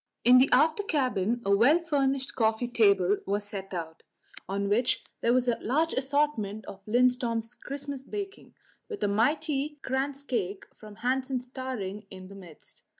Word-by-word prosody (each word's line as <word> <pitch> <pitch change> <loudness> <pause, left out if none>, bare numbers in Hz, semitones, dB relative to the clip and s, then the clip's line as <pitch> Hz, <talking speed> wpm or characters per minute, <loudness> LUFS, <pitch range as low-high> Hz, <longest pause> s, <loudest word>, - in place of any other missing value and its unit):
In 250 +2 +8
the 265 - +4
after 310 +9 +4
cabin 245 - 0
a 200 0 +4
well 250 +10 +5
furnished 275 -5 0
coffee 225 +1 +1
table 200 -5 +3
was 200 +1 0
set 195 -2 -7
out, 165 -3 -6 0.5
on 200 +1 -1
which 235 +5 +1 0.2
there 235 - +2
was 255 0 +2
a 240 - +1
large 310 +8 +1
assortment 265 -7 0
of 195 0 -10
Lindström's 240 -1 +1
Christmas 280 0 -6
baking, 395 +7 -7 0.3
with 430 - -5
a - - +3
mighty 290 +7 0
kransekake 265 -7 -2
from 215 -1 -12
Hansen's 255 -1 -1
towering 230 -6 -5
in 185 0 -10
the 200 - -11
midst. 175 -6 -12
245 Hz, 150 wpm, -28 LUFS, 205-275 Hz, 0.5 s, In